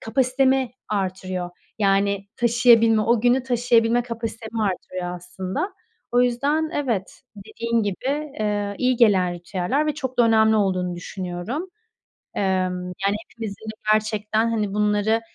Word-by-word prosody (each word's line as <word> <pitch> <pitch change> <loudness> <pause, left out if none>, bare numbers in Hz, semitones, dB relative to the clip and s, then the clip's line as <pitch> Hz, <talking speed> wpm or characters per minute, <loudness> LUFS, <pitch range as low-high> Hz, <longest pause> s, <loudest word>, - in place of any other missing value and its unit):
kapasitemi 260 +1 +1 0.2
arttırıyor. 185 -3 -3 0.3
Yani, 200 -1 +1
taşıyabilme, 230 -2 +5
o 230 +1 +2
günü 245 +2 +3
taşıyabilme 240 -1 +2
kapasitemi 230 -1 -5
arttırıyor 185 -2 -3
aslında. 190 - -4 0.4
O 245 0 +5
yüzden 285 +6 +1
evet, 230 -10 -2 0.2
dediğin 230 +3 -2
gibi, 205 +5 -3 0.3
eee, 205 -1 -1
iyi 255 -1 +2
gelen 190 -6 +4
ritüeller 185 - -1
ve 300 - 0
çok 260 -4 -5
da 240 - +7
önemli 220 -1 +4
olduğunu 185 -3 0
düşünüyorum. 185 - -5 0.7
Emm, 185 -2 0 0.2
yani, 200 - +2
hepimizin 220 -2 -7 0.3
gerçekten, 215 +1 +1
hani, 210 -3 -1
bunları, 210 +2 +2
220 Hz, 120 wpm, -23 LUFS, 195-240 Hz, 0.7 s, da